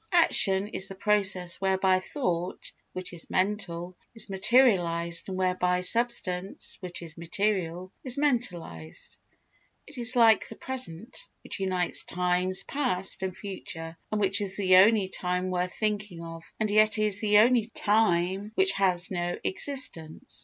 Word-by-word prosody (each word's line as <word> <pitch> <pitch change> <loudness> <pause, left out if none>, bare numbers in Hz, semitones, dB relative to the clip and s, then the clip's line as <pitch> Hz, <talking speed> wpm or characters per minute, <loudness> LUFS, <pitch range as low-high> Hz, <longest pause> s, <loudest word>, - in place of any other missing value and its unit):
Action 200 - +4
is 190 -2 -1
the 195 - -6
process 190 -3 +1
whereby 190 -1 +2
thought, 185 - -4 0.2
which 185 0 -6
is 170 - +1
mental, 185 -3 -2 0.2
is 225 -3 -1
materialised 180 -6 +2
and 185 - -5
whereby 180 -1 0
substance, 195 -3 +1
which 175 -2 -6
is 165 -1 -8
material, 185 0 -2
is 255 -1 -1
mentalised. 180 - -2 0.7
It 290 -3 -11
is 240 +2 +3
like 230 -2 +4
the - - -8
present, 245 -6 -6 0.3
which - - -3
unites 185 -2 +2
times 180 +1 +1
past 215 -11 -1
and 190 -1 -4
future 165 -5 -7 0.2
and 215 - -1
which 200 +1 +4
is 195 -1 -1
the 185 -2 +4
only 205 +1 +5
time 180 0 -3
worth 180 0 -2
thinking 210 -5 -3
of 165 0 -10
and 215 -1 -1
yet 215 +1 +4
is 210 -2 +1
the 210 -1 +3
only 230 0 +4
time 205 -2 0
which 385 0 +4
has 180 -2 +1
no 175 -1 -3
existence. 165 - -3
190 Hz, 145 wpm, -27 LUFS, 180-215 Hz, 0.7 s, only